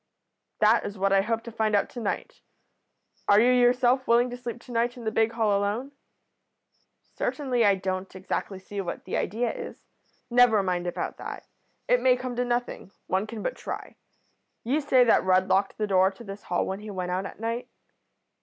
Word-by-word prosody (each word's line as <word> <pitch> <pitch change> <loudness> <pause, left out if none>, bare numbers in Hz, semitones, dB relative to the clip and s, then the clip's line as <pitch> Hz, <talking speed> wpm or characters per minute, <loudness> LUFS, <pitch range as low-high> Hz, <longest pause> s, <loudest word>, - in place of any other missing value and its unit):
"'That 220 +2 +5
is 205 - -6
what 195 +1 +1
I 195 - +5
hope 225 +2 -2
to 235 - -8
find 215 -1 +1
out 200 - +2
to 245 - -7
night? 215 -4 -4 0.9
Are 205 - +6
you 245 +3 +5
yourself 250 +1 +3
willing 240 +1 +3
to - - -4
sleep 240 -1 -6
to 250 - -13
night 240 +1 0
in 240 - -9
the 220 - -1
big 225 +1 +1
hall 220 -3 +2
alone?' 205 +7 -1 1.2
"'Certainly. 255 -5 0
I 200 -2 +5
don't 185 0 -4
exactly 190 +1 -4
see 200 +1 -6
what 175 - -6
the - - -3
idea 230 +4 -1
is.' - - -9 0.5
"'Never 240 -4 +5
mind 180 -1 -1
about 175 - -3
that. - - -7 0.4
It - - +3
may 255 -1 +5
come 250 -1 -5
to 245 - +2
nothing. 240 -5 -2 0.2
One 190 +3 -1
can 220 -1 -7
but - - -2
try. - - -7 0.7
You 275 +7 +1
say 260 -3 +4
that 235 - +4
Rudd 185 0 +3
locked 195 +1 +1
the 215 - 0
door 190 -2 +4
to 195 +4 -13
this 200 -1 -8
hall 175 - 0
when 190 +1 -4
he 210 0 -9
went 185 -2 -4
out 185 +2 -1
at - - -12
night?' 230 +2 -3
220 Hz, 200 wpm, -26 LUFS, 195-245 Hz, 1.2 s, Are